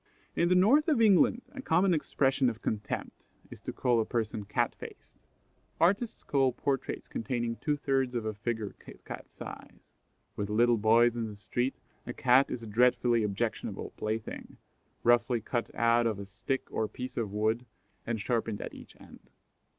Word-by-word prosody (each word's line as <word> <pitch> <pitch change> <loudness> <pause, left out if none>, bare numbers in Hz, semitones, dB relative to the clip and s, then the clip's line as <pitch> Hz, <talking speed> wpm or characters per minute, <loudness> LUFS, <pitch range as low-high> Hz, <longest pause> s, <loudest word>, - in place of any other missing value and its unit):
In 170 - +2
the 180 - +4
North 250 - +5
of 300 -7 +3
England, 225 +3 +5
a 275 - -7
common 180 -3 +3
expression 135 -4 +2
of 115 -2 -8
contempt 105 -1 -4 0.3
is - - -11
to - - -5
call 120 -3 +2
a - - +1
person 110 -3 -2
Cat - - 0
faced. - - -12 0.6
Artists 200 +7 +1
call 135 -3 +2
portraits 135 0 -2
containing 120 0 -2
two 150 -1 -1
thirds 135 -3 0
of 120 - -1
the 110 0 -2
figure 110 0 -3
Kit - - -14
cat - - -8
size. - - -10 0.5
With 105 -1 -3
little 120 +2 +4
boys 115 +2 +5
in 115 -1 -2
the 105 - -9
street 120 +6 -2 0.3
a 120 - -4
Cat 130 +2 +4
is 115 - -4
a - - -6
dreadfully 120 +1 +3
objectionable 100 -2 -2
plaything, 110 0 -4 0.5
roughly 120 0 +4
cut 120 +2 -2
out 115 +1 +3
of 110 -3 -1
a 100 - -6
stick 105 +7 -3
or 110 - 0
piece 125 +4 -7
of 110 -4 -2
wood, 110 +4 0 0.4
and 115 -1 -1
sharpened 115 -1 -1
at - - -6
each - - -13
end. - - -16
120 Hz, 175 wpm, -30 LUFS, 110-135 Hz, 0.6 s, North